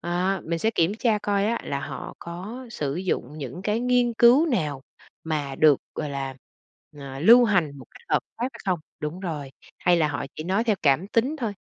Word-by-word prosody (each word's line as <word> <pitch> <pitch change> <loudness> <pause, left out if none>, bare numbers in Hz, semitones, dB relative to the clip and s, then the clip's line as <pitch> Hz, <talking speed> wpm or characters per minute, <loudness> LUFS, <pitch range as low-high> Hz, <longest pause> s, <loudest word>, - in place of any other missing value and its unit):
À, 180 +2 0
mình 165 +1 -2
sẽ 220 +6 +1
kiểm 175 -1 +1
tra 220 -1 +1
coi 200 0 0
á 235 +1 0
là 140 0 -2
họ 150 - -7
có 200 +10 -7
sử 145 -7 -3
dụng 155 -5 -3
những 140 +6 -6
cái 210 +3 0
nghiên 245 -1 +2
cứu 245 +8 +6
nào 155 - -1 0.4
mà 145 -4 -2
được, 150 -3 +5
gọi 150 -2 -3
là, 135 -1 -4 0.6
ờ, 135 -1 -7
lưu 235 +8 +8
hành 170 -10 +1
một 130 - -11
cách - - -16
hợp - - +3 0.2
pháp 235 - -1
hay - - -12
không? 185 -3 +1 0.2
Đúng 150 +5 -4
rồi, 150 -7 -4 0.3
hay 175 -1 +3
là 155 -2 +2
họ 140 -1 -3
chỉ 155 - -5
nói 195 +6 +1
theo 215 -4 +2
cảm 150 +6 +3
tính 250 +8 +1
thôi, 230 -8 -2
180 Hz, 210 wpm, -25 LUFS, 150-225 Hz, 0.6 s, lưu